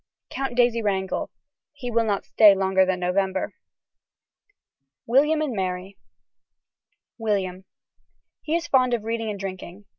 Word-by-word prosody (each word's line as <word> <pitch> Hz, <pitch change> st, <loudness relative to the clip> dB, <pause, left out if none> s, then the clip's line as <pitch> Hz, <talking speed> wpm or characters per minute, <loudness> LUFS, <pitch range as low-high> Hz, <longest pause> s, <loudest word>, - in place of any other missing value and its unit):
(Count 270 Hz, -3 st, -3 dB
Daisy 240 Hz, -1 st, +3 dB
Wrangel.) 190 Hz, -3 st, -1 dB, 0.4 s
He 260 Hz, -4 st, -6 dB
will 230 Hz, 0 st, +2 dB
not 205 Hz, -2 st, -1 dB
stay 210 Hz, -3 st, +6 dB
longer 190 Hz, -1 st, +2 dB
than 185 Hz, -1 st, 0 dB
November. 190 Hz, +1 st, -1 dB, 1.5 s
William 300 Hz, +6 st, +3 dB
and 285 Hz, -5 st, -2 dB
Mary. 185 Hz, 0 st, -3 dB, 1.2 s
(William.) 190 Hz, -4 st, -2 dB, 0.8 s
He 315 Hz, -, -1 dB
is 340 Hz, 0 st, -1 dB
fond 255 Hz, -4 st, +3 dB
of 225 Hz, -, -6 dB
reading 225 Hz, 0 st, -2 dB
and 205 Hz, -2 st, -5 dB
drinking. 190 Hz, 0 st, -7 dB
205 Hz, 125 wpm, -24 LUFS, 190-240 Hz, 1.5 s, stay